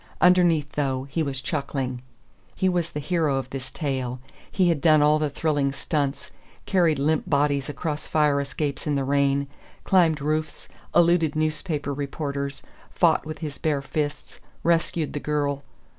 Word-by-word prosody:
Underneath, 175 -5 +4
though, 135 -3 -1
he 140 +4 -3
was 135 -3 -2
chuckling. 130 -2 -3 0.5
He 190 - +1
was 175 -2 0
the 150 - -5
hero 160 -2 0
of 130 -1 -4
this 135 -1 -5
tale; 130 -5 -3 0.3
he 185 -2 +3
had 160 -4 +1
done 155 -3 +5
all 150 +1 +4
the 150 -1 0
thrilling 145 -1 0
stunts, 140 -1 -2 0.3
carried 170 -6 +3
limp 150 +3 0
bodies 145 -1 +1
across 150 +1 -4
fire 150 -2 +2
escapes 140 +1 -3
in 145 - +1
the 140 - 0
rain, 140 0 +2 0.4
climbed 170 -5 +3
roofs, 155 +2 -2 0.3
eluded 170 -3 +4
newspaper 155 -1 -1
reporters, 140 0 -4 0.3
fought - - +2
with 155 0 -5
his 145 -2 -6
bare 145 -3 0
fists, 145 +1 -4 0.2
rescued 165 -2 +1
the 145 - -2
girl.... 145 -1 -1
150 Hz, 155 wpm, -25 LUFS, 140-155 Hz, 0.5 s, done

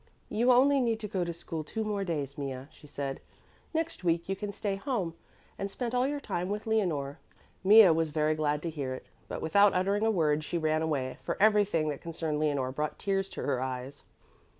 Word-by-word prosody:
"You 240 +4 +3
only 270 +2 +5
need 230 -3 +1
to 210 - -3
go 190 -3 -1
to 170 - -2
school 165 -1 -5
two 220 +8 -3
more 205 -2 -1
days, 145 -6 -3
Mea," 135 -2 -5
she 150 - -16
said. 140 -1 -4 0.5
"Next 325 - -2
week 170 -1 +1
you 195 - -1
can 205 +1 -4
stay 200 0 -2
home 195 - -2 0.5
and 195 - -2
spend 240 +4 -4
all 250 +1 +2
your 290 +1 -2
time 180 -9 -3
with 210 +1 -3
Leonore." 170 -11 0 0.4
Mea 205 -1 +9
was 160 0 +1
very 155 0 +1
glad 150 -1 0
to 170 - -2
hear 135 -4 -3
it, - - -10 0.2
but - - -5
without 200 +5 +5
uttering 200 +3 +1
a 225 - +3
word 155 -7 +2
she 170 - -2
ran 155 -1 +1
away, 140 -5 -2
for - - -3
everything 205 -7 +3
that 145 - -4
concerned 160 -2 -3
Leonore 140 -4 0
brought 150 +3 -3
tears 195 -1 -1
to - - -6
her 130 -3 0
eyes. 130 +1 -5
170 Hz, 210 wpm, -30 LUFS, 150-205 Hz, 0.5 s, Mea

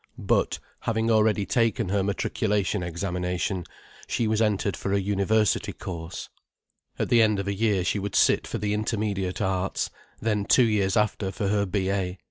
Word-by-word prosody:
But, - - +1 0.2
having 115 0 0
already 110 -2 +3
taken 115 0 +1
her 100 +1 +1
matriculation 100 0 0
examination, 90 +1 -2 0.4
she 115 - 0
was 110 0 +1
entered 100 -3 +1
for 95 - -4
a 100 - +3
university 100 +2 +1
course. 85 -1 -6 0.7
At - - -1
the 120 - +5
end 110 -2 +3
of 100 0 -3
a 100 - 0
year 100 -2 +1
she 100 - 0
would 100 0 -4
sit - - +4
for - - -3
the 105 0 -1
Intermediate 105 -3 -1
Arts, 95 0 -1 0.3
then 105 -2 0
two 125 - +5
years 105 -1 +1
after 105 -2 0
for 100 0 -2
her 100 -1 +1
B.A. 95 -1 -1
100 Hz, 165 wpm, -26 LUFS, 95-110 Hz, 0.7 s, the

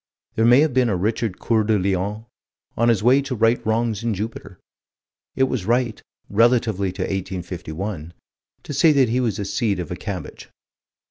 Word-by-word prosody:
There 110 - +1
may 120 +4 +6
have 155 -3 +1
been 125 -2 +3
a 100 - +1
Richard 105 +2 -1
Coeur 110 -2 +1
de 105 0 +2
Lion, 100 +3 -2 0.5
on 115 +1 +2
his 110 -4 +2
way 130 +4 +5
to 140 -2 -4
right 115 +1 +2
wrongs 110 -1 -1
in 115 -3 0
Jupiter. 100 -3 -6 0.8
It 130 - +2
was 130 -7 -1
right, 120 -1 0 0.3
relatively 110 -3 +2
to 95 0 -3
1851, 90 -2 -5 0.5
to - - -6
say 155 +4 +5
that 135 -4 +3
he 125 +3 +1
was 115 -6 -1
a 100 - -3
seed 100 -2 -1
of 85 - -5
a - - -2
cabbage. - - -7
110 Hz, 180 wpm, -22 LUFS, 95-120 Hz, 0.8 s, may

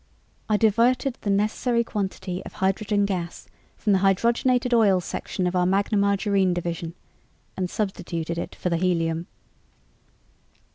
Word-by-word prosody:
I 210 - +3
diverted 235 +4 +2
the 205 - -3
necessary 215 +4 +1
quantity 195 -4 -4
of - - -10
hydrogen 200 +2 +1
gas 180 -4 -4 0.3
from 210 - +1
the 190 - +4
Hydrogenated 235 +6 +2
Oils 200 -6 +4
Section 185 - -3
of 180 +1 -1
our 180 0 +3
Magna 195 +3 +1
Margarine 200 -2 +2
Division 170 -1 -4 0.6
and 185 -1 -2
substituted 170 -5 -3
it - - -5
for 180 - -2
the 170 - +2
helium." 165 -1 0
195 Hz, 135 wpm, -24 LUFS, 180-215 Hz, 0.6 s, the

